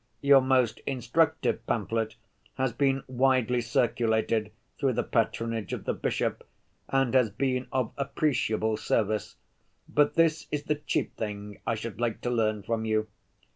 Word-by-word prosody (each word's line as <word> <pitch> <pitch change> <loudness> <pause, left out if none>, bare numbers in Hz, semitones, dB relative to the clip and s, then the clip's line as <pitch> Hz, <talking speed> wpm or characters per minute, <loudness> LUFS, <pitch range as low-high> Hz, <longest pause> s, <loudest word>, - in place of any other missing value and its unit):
Your 140 -1 +7
most 130 -3 +2
instructive 145 +5 +1
pamphlet 110 0 -1 0.4
has 130 -2 0
been 135 +1 +1
widely 130 -1 +2
circulated 110 -2 +1 0.3
through 135 -2 +2
the - - 0
patronage 115 -1 -1
of - - -5
the - - 0
bishop, - - -2 0.5
and 135 -2 +2
has 125 -4 +4
been 130 +4 -1
of 130 -4 0
appreciable 110 -6 0
service.... 110 -1 0 0.5
But 145 0 +2
this 165 -1 +2
is 150 -1 -2
the 150 - +1
chief 150 - -2
thing 105 -1 -6
I 115 - +2
should 110 0 -6
like 120 -2 -1
to 125 - -1
learn 110 -3 +1
from 115 +1 -1
you. 110 -1 0
120 Hz, 145 wpm, -28 LUFS, 110-135 Hz, 0.5 s, Your